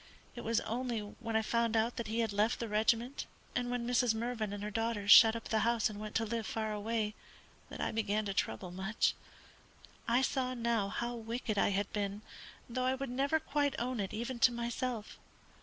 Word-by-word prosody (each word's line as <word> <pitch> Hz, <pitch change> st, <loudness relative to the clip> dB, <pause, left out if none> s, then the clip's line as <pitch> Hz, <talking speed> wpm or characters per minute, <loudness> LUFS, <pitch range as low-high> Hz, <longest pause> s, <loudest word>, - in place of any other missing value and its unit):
It 240 Hz, -, -6 dB
was 230 Hz, 0 st, +1 dB
only 240 Hz, 0 st, -2 dB
when 225 Hz, +2 st, -6 dB
I 220 Hz, -, +3 dB
found 230 Hz, 0 st, +1 dB
that 230 Hz, 0 st, 0 dB
he 225 Hz, +2 st, 0 dB
had 225 Hz, -3 st, -1 dB
left 210 Hz, +3 st, +2 dB
the 230 Hz, -, -3 dB
regiment, 225 Hz, +5 st, +1 dB, 0.3 s
and 245 Hz, 0 st, 0 dB
when 245 Hz, -1 st, -2 dB
Mrs. 245 Hz, -1 st, +2 dB
Mervyn 225 Hz, -2 st, -2 dB
and 205 Hz, 0 st, -5 dB
her 210 Hz, -, -3 dB
daughters 225 Hz, -2 st, 0 dB
shut 225 Hz, +1 st, +10 dB
up 230 Hz, -, -6 dB
the 220 Hz, -, +2 dB
house 230 Hz, -1 st, +2 dB
and 205 Hz, -, -8 dB
went 215 Hz, 0 st, -7 dB
to 225 Hz, -, +2 dB
live 225 Hz, 0 st, -3 dB
far 220 Hz, -1 st, -2 dB
away, 215 Hz, 0 st, -1 dB, 0.6 s
that -, -, -8 dB
I -, -, -1 dB
began 215 Hz, -1 st, 0 dB
to 200 Hz, -, -2 dB
trouble 175 Hz, -, -2 dB
much. 195 Hz, +4 st, 0 dB, 0.9 s
I 245 Hz, +3 st, +3 dB
saw 260 Hz, -2 st, 0 dB
now 230 Hz, -4 st, +1 dB
how 240 Hz, +3 st, -2 dB
wicked 225 Hz, -2 st, -3 dB
I -, -, +4 dB
had 200 Hz, 0 st, -1 dB
been, 205 Hz, 0 st, -2 dB, 0.4 s
though 255 Hz, +1 st, -2 dB
I 260 Hz, +1 st, +2 dB
would 270 Hz, -1 st, -4 dB
never 280 Hz, +5 st, +1 dB
quite 290 Hz, -2 st, 0 dB
own 245 Hz, 0 st, -2 dB
it 195 Hz, -2 st, -2 dB
even 240 Hz, +3 st, -4 dB
to 250 Hz, -, +6 dB
myself. 235 Hz, -1 st, -3 dB
230 Hz, 205 wpm, -33 LUFS, 215-240 Hz, 0.9 s, shut